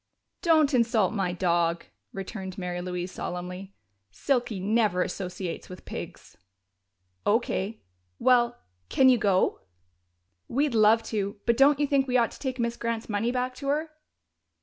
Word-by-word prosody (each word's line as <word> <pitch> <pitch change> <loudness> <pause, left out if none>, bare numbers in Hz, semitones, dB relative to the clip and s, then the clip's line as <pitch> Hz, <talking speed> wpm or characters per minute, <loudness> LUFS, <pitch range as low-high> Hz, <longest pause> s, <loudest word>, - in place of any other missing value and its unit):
"Don't 315 -4 +4
insult 230 -5 +2
my 195 -5 0
dog!" 170 -2 0 0.3
returned 190 0 -6
Mary 180 -1 -3
Louise 180 0 -4
solemnly. 180 +2 -6 0.3
"Silky 235 - -1
never 205 -2 +2
associates 180 -2 -5
with 185 - -11
pigs!" - - -8 0.9
"O.K.... 215 -1 0 0.3
Well, 240 -1 +3 0.3
can 260 -1 +5
you 250 -2 +5
go?" 195 -3 +2 0.9
"We'd 280 +1 0
love 220 +1 +5
to, 200 -1 -2
but 235 - +3
don't 275 +3 +5
you 295 - +3
think 275 -1 +2
we 250 0 +2
ought 235 -2 +2
to - - -12
take 260 -2 -3
Miss 235 0 -1
Grant's 230 -1 -3
money 220 +3 0
back 250 0 -1
to 275 - -6
her?" 305 +3 0
220 Hz, 145 wpm, -27 LUFS, 185-250 Hz, 0.9 s, can